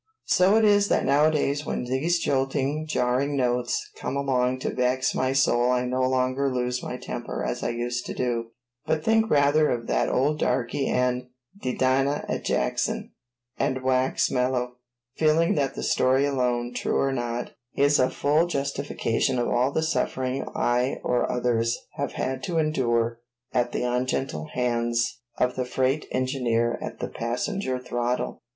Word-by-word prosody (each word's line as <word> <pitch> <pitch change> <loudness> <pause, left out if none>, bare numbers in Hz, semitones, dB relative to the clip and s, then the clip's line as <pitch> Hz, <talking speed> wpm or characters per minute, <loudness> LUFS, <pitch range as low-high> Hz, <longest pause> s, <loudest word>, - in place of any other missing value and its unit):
So 185 +3 +4
it 220 - +4
is 205 -1 +4
that - - +1
nowadays 145 0 +2
when - - -3
these 135 +8 +1
jolting, 140 +1 0
jarring 135 +1 0
notes 125 -5 0
come 140 - -3
along 130 -2 +1
to - - -2
vex 130 +1 +1
my 130 0 0
soul 125 -2 +3
I 125 0 +1
no 130 +1 -1
longer 130 +1 +1
lose 125 0 -1
my - - -5
temper - - -5
as - - -3
I - - -1
used 120 +1 -3
to - - -5
do, 120 -2 -1 0.4
but 155 -1 0
think 225 +2 +3
rather 150 +1 +4
of 120 -1 -2
that - - +1
old 150 +4 +1
darky 135 +3 0
and 125 0 0 0.3
"de 125 - -2
dinah 135 +2 +1
at - - -3
Jackson," 60 - -1 0.5
and 130 0 0
wax 130 0 +1
mellow, 125 -1 0 0.4
feeling 160 +2 +3
that 140 -3 0
that - - -4
story 130 +2 +3
alone, 125 -3 0
true - - -1
or 135 - +1
not, 120 -1 -3 0.2
is 145 +1 +4
a 130 - +4
full 150 +4 +2
justification 140 -4 -1
of 120 - 0
all 125 +3 +2
the 160 - 0
sufferings 130 -4 -1
I 125 +2 +1
or 125 -1 +1
others 120 -2 +1 0.2
have - - -2
had 130 0 -2
to 175 -2 -2
endure 120 -7 +1 0.3
at 120 -1 +1
the - - -2
ungentle 125 - -1
hands 120 0 0 0.2
of 125 0 +1
the 130 - -1
freight 130 +3 0
engineer 125 -3 0
at - - -6
the - - -3
passenger 130 - -2
throttle. 120 0 -2
130 Hz, 160 wpm, -25 LUFS, 125-140 Hz, 0.5 s, So